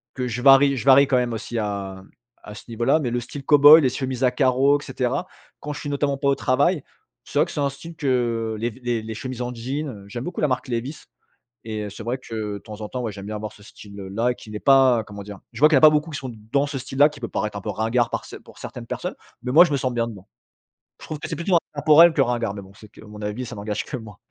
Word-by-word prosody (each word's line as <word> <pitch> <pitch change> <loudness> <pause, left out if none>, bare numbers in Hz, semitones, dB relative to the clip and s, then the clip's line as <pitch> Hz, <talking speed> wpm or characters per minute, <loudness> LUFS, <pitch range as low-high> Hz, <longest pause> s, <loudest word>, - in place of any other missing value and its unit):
que 125 -1 -2
je 125 +1 -4
varie 140 0 +6
je 120 - -5
varie 135 +1 +7
quand 130 - +2
même 120 -2 0
aussi 115 +1 -5
à 100 -2 -4 0.4
à 105 - -10
ce - - -11
niveau-là 120 +7 +1
mais 125 -5 -2
le 120 - 0
style 135 +4 -8
cow-boy 145 +2 +8
les 130 - +2
chemises 130 0 -3
à 125 - +4
carreaux 135 +2 +3
et - - -11
cetera, 135 +5 -2 0.3
quand 150 - -5
je 145 - -7
suis 145 - -5
notamment 140 -1 -1
pas 140 0 0
au 140 - +3
travail, 140 +5 +1 0.4
c'est 145 - -5
vrai 155 - +5
que 170 - -10
c'est 150 - -5
un 140 - +1
style 165 +5 -11
que 120 -6 -1
les 120 +1 -1
v 130 - -16
les 120 -2 -1
les 110 - -6
chemises 130 +1 -6
en 125 0 -4
jean, 135 +6 -4
heu 100 -5 -10
j'aime 120 +4 -6
beaucoup 180 - -5
la 150 - +3
marque 130 +2 -2
Levi's. 125 +6 -4 0.6
Et 110 -1 -4
heu, 105 - -6
c'est 105 - -9
vrai 125 +2 -2
que 110 -4 -5
de - - -5
temps 105 +2 -11
en 105 - -5
temps, 125 - -5
ouais, 110 -3 -3
j'aime 100 0 -9
bien 105 0 -4
avoir 105 0 -6
ce 105 - -18
style 100 0 -14 0.2
là 120 +4 0
qui 110 - -14
n'est 105 - -5
pas, 130 -4 +5
comment 100 -1 -9
dire? 100 0 -10
Je 115 - -9
vois 150 - +8
qu'il 155 - +3
y - - +7
a - - +1
pas 155 - +9
beaucoup 150 +2 0
qui 145 - -5
sont 130 -3 -6 0.2
dans 140 +1 +2
ce 145 - -5
style-là, 140 +3 +3
qui 145 -2 -13
peut 115 - -4
paraître 105 0 -3
un - - -4
peu - - -6
ringard 115 +2 0
par - - -3
ce - - -11
pour - - -16
certaines - - -8
personnes, - - -4 0.3
mais 125 - -2
moi, 165 +5 +9
je 175 - -2
me - - +2
sens 130 -2 -2
bien 115 0 0
dedans. 100 -4 -11 0.8
Je - - -9
trouve 155 -2 -6
que - - -6
c'est - - -3
plutôt 170 +1 +2 0.2
intempore 150 +3 +6
que 155 - -4
ringard, 120 -4 0
mais 100 - -6
bon, 95 0 -15
c'est 105 +1 -15
que - - -20
mon 105 0 -11
avis, 105 +5 -4
ça 120 -1 -8
n'engage 105 +1 -4
que 140 - -6
moi. 105 -3 -12
125 Hz, 290 wpm, -23 LUFS, 110-140 Hz, 0.8 s, pas